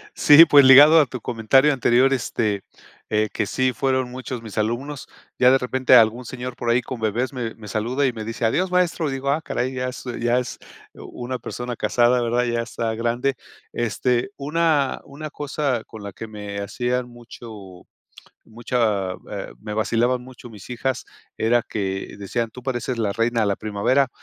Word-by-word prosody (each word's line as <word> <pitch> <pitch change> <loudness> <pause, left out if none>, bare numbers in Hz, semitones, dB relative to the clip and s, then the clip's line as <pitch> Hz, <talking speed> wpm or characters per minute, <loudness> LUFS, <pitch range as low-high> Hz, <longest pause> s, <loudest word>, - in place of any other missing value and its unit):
Sí, 150 +1 +8
pues 145 -2 +7
ligado 145 +5 +9
a 150 - +3
tu 125 0 -7
comentario 125 +6 +3
anterior, 130 0 +3
este, 110 -6 -1 0.5
eh, 110 0 +1
que 110 - -1
sí 130 +4 0
fueron 130 -1 -1
muchos 125 -1 -6
mis 110 -3 -10
alumnos, 125 +6 -3 0.3
ya 125 0 +6
de 135 - +5
repente 130 0 +2
algún 115 +1 +5
señor 125 +1 -7
por 120 - -2
ahí 120 +2 +3
con 120 0 -7
bebés 115 +5 -1
me 120 -4 -4
me 105 -2 -12
saluda 120 +7 -1
y 130 - 0
me 110 -2 -7
dice: 115 +1 -4
"Adiós 180 +12 +1
maestro." 180 -3 +1
Y - - -3
digo: 135 +1 -2
"Ah 145 +3 +1
caray, 130 -4 -2
ya 125 0 -2
es 125 - -8 0.2
ya 120 +1 +2
es 125 -1 -5 0.4
una 125 +1 -7
persona 120 +1 -6
casada," 120 +2 +2
¿verdad?, 120 +1 +1
ya 120 -1 -1
está 115 -1 -3
grande. 120 +4 -1 0.4
Este, 120 - -1
una 150 -1 0
una 150 +2 -8
cosa 140 -5 -2
con 110 - -12
la 100 -1 -7
que 115 - -8
me 105 -2 -7
hacían 125 +5 -2
mucho 110 -6 -12 0.6
mucha 110 -4 -1 0.2
eh, - - -6
me 105 - -6
vacilaban 120 +3 0
mucho 125 -1 -12
mis 105 -3 -13
hijas 125 0 -2 0.3
era 120 +2 +2
que 95 -3 -4
decían: 110 +3 -3
"Tú 125 +3 -12
pareces 125 -1 -3
la 105 -3 0
reina 115 +2 0
de 110 - +2
la 100 -1 0
primavera," 110 +6 +1
120 Hz, 185 wpm, -22 LUFS, 110-130 Hz, 0.6 s, ligado